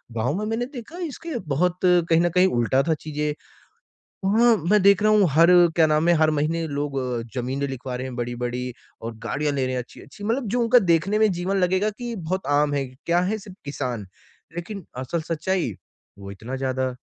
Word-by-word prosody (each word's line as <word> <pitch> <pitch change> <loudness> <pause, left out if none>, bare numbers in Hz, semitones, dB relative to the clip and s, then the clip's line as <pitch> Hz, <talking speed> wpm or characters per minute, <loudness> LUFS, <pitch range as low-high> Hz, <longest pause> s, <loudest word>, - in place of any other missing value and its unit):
गाँव 120 +5 0
में 215 - -2
मैंने 225 +3 -1
देखा 265 +7 -9
इसके 320 -1 -5
बहुत 170 +5 +1
कहीं 175 -2 +4
न 175 - +2
कहीं 180 +1 +6
उल्टा 120 +3 +2
था 165 - +3
चीज़ें। 150 -1 -2 0.9
वहाँ 225 +4 +4
मैं 210 0 +5
देख 200 +1 +5
रहा 215 0 +4
हूँ 210 -2 +5
हर 165 +4 +5 0.3
क्या 165 -2 +5
नाम 155 +2 +2
है 175 - +6
हर 155 - +4
महीने 155 +2 0
लोग 145 -2 -3 0.4
ज़मीनें 130 +3 -2
लिखवा 130 -1 -5
रहे 130 +1 -4
हैं 130 -2 -7
बड़ी-बड़ी 120 +1 -3 0.3
और 115 0 -6
गाड़ियाँ 150 0 -1
ले 135 -2 0
रहे 130 - -2
हैं 125 - -1
अच्छी-अच्छी 135 +10 -13
मतलब 235 +4 0
जो 245 +5 0
उनका 235 +1 +5
देखने 185 +6 +1
में 215 -1 +4
जीवन 180 +3 -2
लगेगा 185 +3 +2
कि 235 +2 -6
बहुत 185 +1 -3
आम 145 -1 +1
है, 140 -1 -1 0.2
क्या 170 +1 +3
है 195 +5 -1
सिर्फ़ 200 -3 -12
किसान। 125 -7 -4 0.5
लेकिन 185 +2 -6
असल 130 +6 -2
सच्चाई 165 - -1 0.4
वो 100 0 -9
इतना 110 +7 -6
ज़्यादा 130 -1 -1
165 Hz, 195 wpm, -24 LUFS, 130-200 Hz, 0.9 s, कहीं